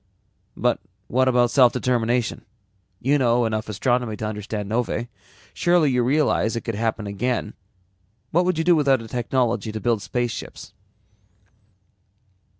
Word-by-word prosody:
"But - - +1 0.3
what 130 +2 +2
about 120 -2 +3
self 125 -4 +5
determination? 120 -1 0 0.6
You 140 +3 +2
know 120 -1 +3
enough 110 -1 -2
astronomy 120 +1 0
to 110 - -4
understand 105 -1 -4
novae. 120 +1 -2 0.4
Surely 175 -5 +3
you 125 -1 +2
realize 130 -4 +1
it 115 - -2
could 115 - -4
happen 110 0 -2
again. 105 +2 -2 0.8
What 175 +3 +3
would 180 -2 +1
you 160 - +1
do 175 +1 +5
without 135 -5 +2
a - - -9
technology 120 -1 -1
to 110 - -5
build 115 -2 0
spaceships?" 120 +2 -4
120 Hz, 140 wpm, -23 LUFS, 110-130 Hz, 0.8 s, self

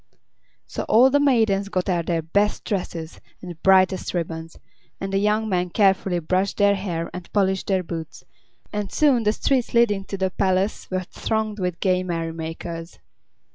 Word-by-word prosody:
So - - -5
all 250 +5 +6
the 285 - +4
maidens 220 -8 +2
got 185 -2 -1
out 175 -3 0
their 165 -2 0
best 200 +6 0
dresses 170 -5 -4 0.2
and 175 -3 -9
brightest 190 -1 +3
ribbons, 165 -1 -4 0.4
and 195 0 -4
the 195 - +3
young 210 +2 +1
men 180 -3 0
carefully 190 -2 +2
brushed 185 +4 0
their 200 -1 +4
hair 175 -4 -3
and 180 -1 -8
polished 190 -2 +1
their 190 -2 +1
boots, 165 -2 -7 0.5
and 205 -2 -3
soon 280 -6 +3
the 210 -1 +2
streets 250 +2 0
leading 210 -4 +3
to 195 - -5
the 190 0 0
palace 190 +2 0
were 185 0 -2
thronged 215 +3 -3
with 180 -2 -2
gay 185 -2 +2
merry 165 -2 -3
makers. 165 +1 -6
190 Hz, 170 wpm, -23 LUFS, 175-210 Hz, 0.5 s, all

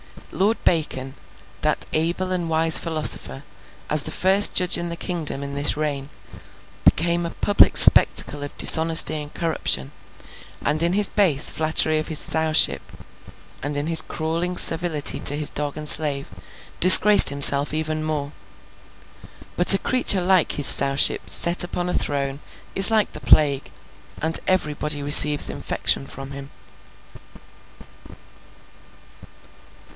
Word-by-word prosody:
Lord 210 +4 -4
Bacon, 135 -5 -5 0.5
that - - -5
able 170 +4 -4
and 175 -2 -6
wise 160 0 +2
philosopher, 155 -4 0 0.4
as 150 -1 +2
the - - -9
First 195 +2 +1
Judge 180 -1 -1
in 175 0 -9
the 170 - -8
Kingdom 165 -5 -9
in 140 0 -11
this 145 +1 -3
reign, 145 -2 -7 0.8
became 170 +1 -2
a - - -7
public 205 - -1
spectacle 145 - +6
of 145 - -11
dishonesty 160 -1 +4
and 150 0 -14
corruption; 155 - -5 0.7
and 155 +1 -2
in 170 +1 -3
his 205 +1 -2
base 165 -9 -2
flattery 155 0 -1
of 155 - -9
his 160 - -2
Sowship, 160 +1 0 0.8
and 145 0 -8
in 145 - -7
his 165 -1 +4
crawling 165 +3 -8
servility 165 -3 +1
to 145 - -1
his 150 -1 -4
dog 145 0 -8
and 150 0 -5
slave, 145 -3 +3 0.5
disgraced 205 +3 +7
himself 140 0 +4
even 155 0 -7
more. 150 -2 -8 1.3
But, 175 +3 +4
a - - -2
creature 225 -5 -1
like 185 -1 -2
his 145 - 0
Sowship 135 0 +2
set 170 +1 +2
upon 175 0 -8
a - - -6
throne 140 -1 -6 0.3
is 195 +2 +4
like 220 -2 -3
the - - -12
Plague, 140 -3 -2 0.5
and 160 +1 -2
everybody 150 -4 -4
receives 145 +1 +5
infection 135 - -5
from 135 0 -13
him. 140 0 -13
155 Hz, 135 wpm, -17 LUFS, 145-175 Hz, 1.3 s, disgraced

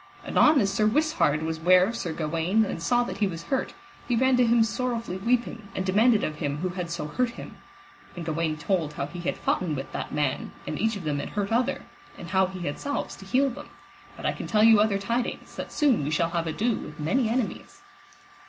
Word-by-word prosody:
Anon 305 -2 +5
as 195 -4 +1
Sir 215 +1 +2
Wisshard 290 - +2
was 160 0 -3
ware 180 +2 +6
of 230 +4 -3
Sir 180 -7 -3
Gawaine 165 +7 +1
and 180 - -4
saw 245 +7 +2
that 240 - -6
he 205 - +3
was 170 -3 -6
hurt, 265 +9 -2 0.3
he 245 - +1
ran 260 +2 +3
to 250 -1 +4
him 230 0 +5
sorrowfully 230 -4 -2
weeping, 230 0 -1
and 190 - -2
demanded 215 +4 +4
of 155 -1 -2
him 145 -1 -2
who 185 +4 -2
had 180 -1 -4
so 170 -2 -3
hurt 245 +11 0
him; - - -9 0.6
and 175 -2 -6
Gawaine 160 -1 -1
told 155 -1 -1
how - - -3
he 175 - -8
had 170 - -2
foughten 170 -5 0
with 135 0 -6
that - - -5
man, 145 -3 -1
and 155 - -4
each 225 +1 +1
of 200 - -6
them 150 -2 -1
had - - -4
hurt 200 0 -2
other, 240 +2 +1 0.3
and 170 - -9
how 190 0 +3
he 185 -1 -8
had 145 -4 -3
salves 285 0 -3
to 195 - -12
heal 260 +6 +2
them; - - -10 0.5
but - - -8
I - - +3
can - - -6
tell 215 -1 +3
you 225 -1 +7
other 210 -1 +3
tidings, 235 +5 -3
that - - -6
soon 275 - +2
we 140 - -1
shall 165 +2 +1
have 170 -1 -1
ado 225 +9 0
with 150 +2 -9
many 220 - +1
enemies. 235 -1 -3
195 Hz, 230 wpm, -26 LUFS, 165-235 Hz, 0.6 s, you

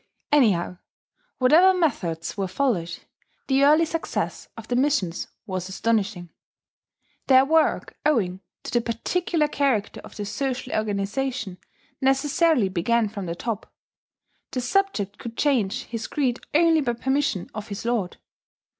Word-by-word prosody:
Anyhow, 195 -11 +3 0.6
whatever 340 +9 +5
methods 175 - -1
were 195 -2 -2
followed, 185 -5 -1 0.5
the 270 0 +2
early 305 +3 +6
success 330 0 -3
of 225 0 -9
the 245 - -1
missions 250 - 0 0.2
was 185 -3 -4
astonishing. 195 -3 -1 1.0
Their 260 0 +6
work, 320 +2 +2
owing 205 -12 +1 0.2
to - - -6
the 240 - +2
particular 300 +8 0
character 270 -9 0
of - - -13
the 205 - -4
social 260 +4 -3
organization, 210 0 -2 0.4
necessarily 275 - +3
began 210 +5 +1
from 200 -3 -6
the 170 - -3
top: 225 +3 -4 0.8
the 255 - -3
subject 245 - 0
could 230 -1 -8
change 250 -4 +1
his 230 -1 -5
creed 255 -5 0 0.2
only 325 0 +5
by 240 -4 0
permission 265 -5 -1
of 215 0 -6
his 200 +2 -6
lord. 230 -7 -1
235 Hz, 130 wpm, -24 LUFS, 200-280 Hz, 1.0 s, early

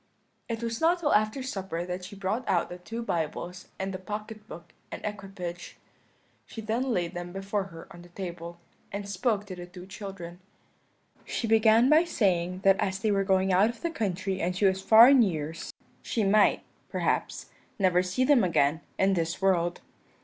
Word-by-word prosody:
"It 230 0 -3
was 230 -1 -3
not 335 +2 +4
till 315 -4 +1
after 215 +5 +1
supper 190 -8 -4
that 180 0 -5
she 190 - -9
brought 200 +5 -2
out 175 - +1
the 180 - -8
two 225 +6 -6
Bibles 175 -1 -3
and 190 0 -3
the 185 - -5
pocket 210 +2 -7
book 170 -2 -11 0.2
and - - -5
equipage. 195 -4 -6 0.7
She - - -9
then 230 +4 -1
laid 175 -5 -1
them 175 -1 -6
before 195 +1 -2
her 165 -3 -11
on 175 - -11
the 175 - -15
table, 170 -2 -7 0.3
and 200 0 -4
she 200 - -6
spoke 205 +1 0
to 190 -2 -7
the 175 0 -8
two 180 0 -11
children: 190 -3 -8 0.8
"She - - -3
began 225 +1 +5
by 310 +4 +5
saying 185 - 0
that 195 0 +5
as 190 -1 0
they 215 +1 0
were 195 -1 +2
going 190 -1 +2
out 195 +5 +5
of 235 - -8
the 335 - -1
country 195 - -2
and 180 +2 -1
she 200 - +1
was 190 0 +2
far 225 +4 +8
in 270 -1 +7
years, 160 -6 -2 0.3
she 225 - -1
might, 205 +1 +4 0.3
perhaps, - - -2 0.3
never 185 -3 +3
see 185 +7 -1
them 255 -4 +5
again 160 -3 +2 0.2
in 195 +1 +3
this 165 -2 -1
world. 175 -3 +1
195 Hz, 190 wpm, -28 LUFS, 180-220 Hz, 0.8 s, far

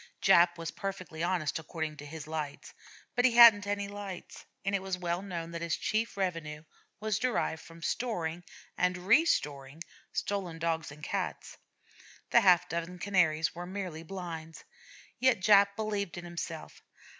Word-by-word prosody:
Jap 175 -2 +5
was 165 -1 -4
perfectly 185 -5 -6
honest 170 -4 0
according 160 -1 -5
to 145 - -9
his 155 0 -7
lights, 155 -2 -5 0.4
but 245 - +2
he 255 -2 +5
hadn't 225 -4 +9
any 205 0 -1
lights; 200 -3 -8 0.2
and 195 - 0
it 200 - +1
was 190 -1 -3
well 175 0 -2
known 170 -4 -5
that 170 0 -5
his 170 -1 -1
chief 220 0 -1
revenue 165 -5 -3 0.4
was 215 -1 -1
derived 245 -10 0
from 165 0 -13
storing 175 -6 -2 0.3
and 180 0 +1
restoring 165 - +1 0.3
stolen 190 -5 -2
Dogs 165 -2 -1
and 150 +1 -13
Cats. - - -4 0.7
The 235 - +7
half 180 -3 +5
dozen 170 +1 -4
Canaries 175 -5 +2
were 175 +1 -7
mere 190 -1 -4
blinds. 165 -3 -7 0.6
Yet 260 -4 +4
Jap 200 +1 +5
believed 205 -4 -2
in 175 - -6
himself. 170 -2 -6
180 Hz, 155 wpm, -31 LUFS, 165-200 Hz, 0.7 s, hadn't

